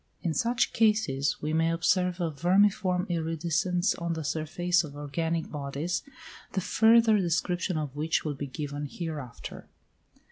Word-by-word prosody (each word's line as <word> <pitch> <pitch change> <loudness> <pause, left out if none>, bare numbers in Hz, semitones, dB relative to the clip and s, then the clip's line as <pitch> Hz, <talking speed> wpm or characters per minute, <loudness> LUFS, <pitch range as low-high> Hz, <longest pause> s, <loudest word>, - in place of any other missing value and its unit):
In 170 - 0
such 235 - +1
cases 210 -14 +1
we 155 +1 -1
may 165 +1 +2
observe 180 +2 +1
a 170 -2 -1
vermiform 180 +3 +2
iridescence 170 +2 0
on 170 0 -3
the 160 -1 -4
surface 160 +4 0
of 145 -2 -9
organic 160 +3 -2
bodies, 150 +4 -3 0.5
the 195 - +1
further 220 +2 +5
description 175 0 0
of 145 -3 -4
which 155 +3 0
will 150 - -1
be 140 +1 -5
given 145 +1 -5
hereafter. 150 -8 -7
165 Hz, 140 wpm, -28 LUFS, 150-180 Hz, 0.5 s, further